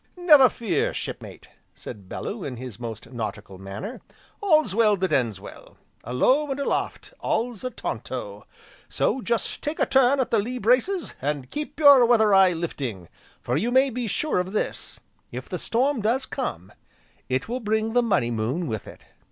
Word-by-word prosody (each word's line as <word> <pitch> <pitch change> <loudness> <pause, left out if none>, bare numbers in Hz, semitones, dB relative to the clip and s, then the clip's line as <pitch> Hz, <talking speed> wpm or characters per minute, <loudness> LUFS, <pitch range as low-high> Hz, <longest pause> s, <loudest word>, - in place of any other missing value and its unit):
"Never 300 -8 +7
fear, 230 -4 -1
Shipmate!" - - -7 0.3
said 100 -5 -10
Bellew 205 -2 -5
in 130 -3 -5
his 120 -3 -8
most 115 0 -7
nautical 105 -4 -6
manner, 100 - -7 0.4
"'all's 310 - +3
well 215 -1 +4
that 190 0 -1
ends 115 -7 +1
well,' - - -13 0.3
a 120 - -7
low, 270 - +3
and 270 +1 -3
aloft 280 - -2
all's 230 -2 -2
a 255 - -1
taunto. 110 - -6 0.4
So 260 +4 0
just 235 -1 -2
take 300 +2 -3
a - - +3
turn 265 +1 +4
at 260 - 0
the 225 - +3
lee 245 +5 -3
braces, 255 - +1
and 140 -1 -3
keep 295 0 -5
your 285 -4 +8
weather 220 -3 +4
eye 190 -2 +6
lifting, 130 - -5 0.3
for 120 - -1
you 215 - 0
may 260 +2 +4
be 245 0 -3
sure 300 +1 0
of 185 +2 -3
this, 215 - -3 0.3
if - - -7
the - - -4
storm 255 +2 0
does 240 +5 +1
come, 95 - -5 0.6
it 130 +1 -1
will 245 +3 -3
bring 220 0 -1
the 245 - +4
Money 195 - +1
Moon 120 +10 -1
with 110 -7 -4
it." - - -12
215 Hz, 175 wpm, -25 LUFS, -, 0.6 s, your